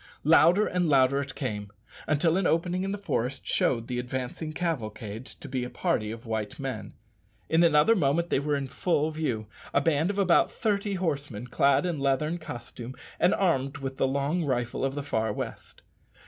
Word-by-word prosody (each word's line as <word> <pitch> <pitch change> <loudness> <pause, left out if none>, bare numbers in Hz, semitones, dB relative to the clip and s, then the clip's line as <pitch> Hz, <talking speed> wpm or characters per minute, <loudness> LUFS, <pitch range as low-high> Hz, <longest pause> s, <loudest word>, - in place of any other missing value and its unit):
Louder 170 +6 +6
and 180 -2 0
louder 135 0 +4
it 135 -1 -7
came, 105 -7 -4 0.4
until 160 +2 +2
an 190 -1 +2
opening 175 +3 +1
in 195 - -2
the 205 - -2
forest 135 - -2
showed 115 -2 +1
the 125 -1 -2
advancing 130 +5 -4
cavalcade 115 -9 -4
to - - -10
be 130 -1 -2
a 125 - -4
party 105 -3 -1
of 115 +2 -7
white 110 -2 -3
men. - - -5 0.5
In 165 +1 +4
another 165 +7 +5
moment 170 0 +1
they - - +3
were 145 +1 0
in 140 -1 -2
full 150 +3 0
view 140 -9 -2 0.3
a - - +6
band 155 +3 +2
of 205 - -2
about 185 -4 +4
thirty 205 -2 -1
horsemen, 145 - -2
clad 140 +4 +3
in 175 -3 -1
the 140 - -4
leathern 150 +5 +1
costume 120 -3 -8 0.2
and 180 - +4
armed 140 -6 +1
with 135 -1 -5
the - - +2
long 140 +6 0
rifle 125 -4 -1
of 135 0 0
the 145 - -3
far 110 -6 0
west. - - -7
140 Hz, 190 wpm, -28 LUFS, 125-170 Hz, 0.5 s, Louder